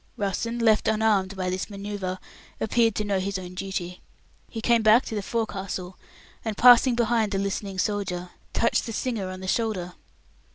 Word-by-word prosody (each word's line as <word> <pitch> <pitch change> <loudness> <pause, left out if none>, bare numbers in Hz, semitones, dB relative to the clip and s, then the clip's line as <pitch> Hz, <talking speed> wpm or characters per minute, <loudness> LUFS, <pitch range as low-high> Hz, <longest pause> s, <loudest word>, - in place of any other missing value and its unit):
Russen, 230 +3 -2
left 220 -2 +3
unarmed 215 -3 +2
by 185 -1 -1
this 185 +3 -3
manoeuvre, 200 -2 -5 0.4
appeared 225 0 +2
to 210 - -1
know 200 -2 0
his 195 +1 -2
own 180 -1 -8
duty. 185 -1 -5 0.5
He 225 - -6
came 235 0 +3
back 220 +3 +5
to - - -6
the 210 - -1
forecastle, 195 -4 -4 0.5
and 220 -3 -3
passing 245 0 +7
behind 230 -3 +1
the - - +1
listening 195 0 -3
soldier, 185 -3 -2 0.2
touched 230 - +1
the 230 - -4
singer 220 -6 -2
on 185 0 -7
the 190 - -6
shoulder. 190 -5 -1
205 Hz, 170 wpm, -25 LUFS, 190-225 Hz, 0.5 s, passing